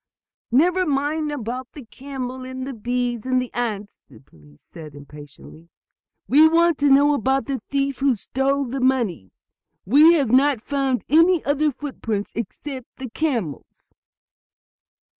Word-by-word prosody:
"Never 355 +9 +3
mind 295 +2 -1
about 255 -1 -6
the 285 -5 -11
camel, 260 0 -7
and 260 0 -6
the 275 - -6
bees 240 0 -3
and 255 0 +1
the 250 -1 -5
ants," 210 -4 -4
the 120 -6 -16
policemen 75 - -22
said 155 - -13
impatiently. 145 +3 -14 0.6
"We 305 +4 +6
want 335 0 +2
to 285 0 +3
know 285 +2 +5
about 265 -1 0
the 270 -2 -4
thief 275 -1 -1
who 270 -2 +2
stole 275 +5 -1
the 265 +2 -4
money. 235 - 0 0.6
You 300 - +6
have 275 -8 0
not 270 0 +3
found 270 +1 -2
any 330 +3 +4
other 290 +2 +1
footprints 240 -7 -5
except 255 +4 -6
the 260 -3 -8
camel's?" 230 - -4
260 Hz, 140 wpm, -22 LUFS, 230-285 Hz, 0.6 s, We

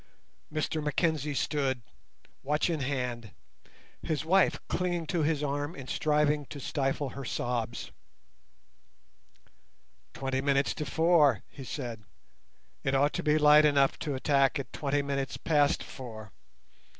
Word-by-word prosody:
Mr 155 0 -2
Mackenzie 150 -1 0
stood, 135 -4 -1 0.6
watch 150 +5 0
in 160 - -1
hand, 125 -5 -3 0.7
his 155 0 -2
wife 190 +3 +3
clinging 175 -2 -1
to 170 +1 -1
his 150 -1 +1
arm 145 +2 -2
and 130 -2 -9
striving 150 0 +1
to 145 - -8
stifle 135 +1 -1
her 140 - -7
sobs. 120 -2 -3 2.2
"Twenty 135 -1 -1
minutes 140 0 +2
to 150 - -5
four," 160 -1 +4
he 135 - -10
said, 120 -4 -5 0.8
"it 135 0 +1
ought 145 +2 +3
to - - -2
be 150 0 +3
light 150 0 +7
enough 140 -2 +3
to 145 -4 -3
attack 140 +2 +2
at 135 -4 -6
twenty 145 -1 0
minutes 140 -1 -2
past 145 -3 +2
four. 110 -5 -9
145 Hz, 130 wpm, -29 LUFS, 135-150 Hz, 2.2 s, light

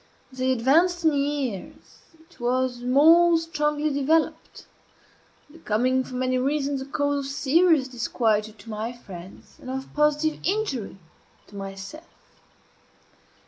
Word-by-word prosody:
As 260 0 -9
I - - +1
advanced 310 +8 +2
in 315 - +4
years 280 -7 -3 0.2
it 325 +2 -23
was 245 0 -1
more 325 +7 +5
strongly 300 -2 -1
developed; 305 +3 0 0.9
becoming, 255 -3 0
for 255 - -9
many 255 0 0
reasons, 275 0 -1
a 265 - -7
cause 285 +1 0
of 275 0 -5
serious 295 +1 +3
disquietude 220 -3 -1
to 230 - -14
my 220 +3 -4
friends, 190 -6 -13
and 255 - -9
of 265 +1 -6
positive 300 +1 +1
injury 355 - -2 0.5
to 205 - -17
myself. 195 - -8
270 Hz, 125 wpm, -25 LUFS, 245-305 Hz, 0.9 s, more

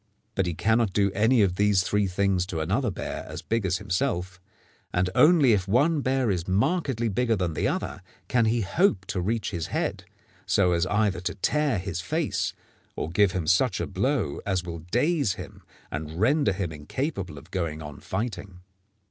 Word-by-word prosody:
But 95 -3 0
he 85 - -2
cannot 110 0 +2
do 100 -1 +2
any 110 +4 +4
one - - +6
of 90 -1 -2
these 105 -2 +3
three 100 +2 +1
things 95 -1 +1
to 85 -4 -3
another 100 - 0
bear 95 - -5
as - - -7
big 115 -3 0
as 90 0 +1
himself, 90 0 -2 0.5
and 90 +1 +1
only 150 -7 +6
if 95 -2 0
one 145 +9 +3
bear 130 -4 +1
is 90 -3 -2
markedly 125 - +1
bigger 115 +2 +1
than 90 -4 -1
the - - 0
other - - -3 0.3
can 120 -2 +2
he 115 +1 +2
hope 100 - +1
to 95 - -2
reach 110 +5 -1
his 85 -4 -3
head, - - -2 0.4
so 90 - +3
as 85 +1 +1
either 100 -1 +1
to 90 +1 -3
tear 145 +4 +1
his 90 -2 -3
face 155 - -1 0.4
or 80 - -3
give 95 +1 +3
him 90 -3 -2
such 90 +10 +2
a - - -1
blow 100 - -1
as 95 -2 -1
will 85 -1 -6
daze 140 - +2
him - - -10 0.3
and 80 +3 -5
render 140 +2 +3
him 95 -3 -3
incapable 90 - -4
of 70 - -13
going 80 -4 -3
on 75 -1 -8
fighting. 95 -3 -5
100 Hz, 190 wpm, -26 LUFS, 90-120 Hz, 0.5 s, one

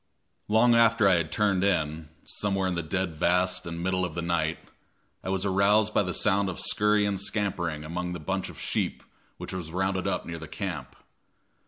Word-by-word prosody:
Long 110 +3 +4
after 115 -2 +5
I 95 - +5
had 80 -2 -2
turned 100 -2 +1
in, 80 -5 0 0.2
somewhere 95 -2 -1
in 90 - -1
the 85 - -1
dead 85 0 -2
vast 90 +2 +1
and 85 0 -5
middle 95 0 0
of 85 -3 -3
the 85 - -2
night, 85 -2 0 0.7
I - - -4
was 95 0 0
aroused 100 +2 +3
by - - +4
the 90 -2 -2
sound 100 0 +2
of 90 - -5
scurry 105 0 +2
and 100 -2 -1
scampering 90 -7 -2
among 90 +3 -4
the 90 - -5
bunch 95 +4 -3
of - - -11
sheep - - -2 0.3
which - - -7
was 90 -3 -5
rounded 95 +1 -1
up 95 -2 -1
near 85 -1 -6
the 80 - -8
camp. 80 -6 -5
95 Hz, 195 wpm, -27 LUFS, 85-100 Hz, 0.7 s, after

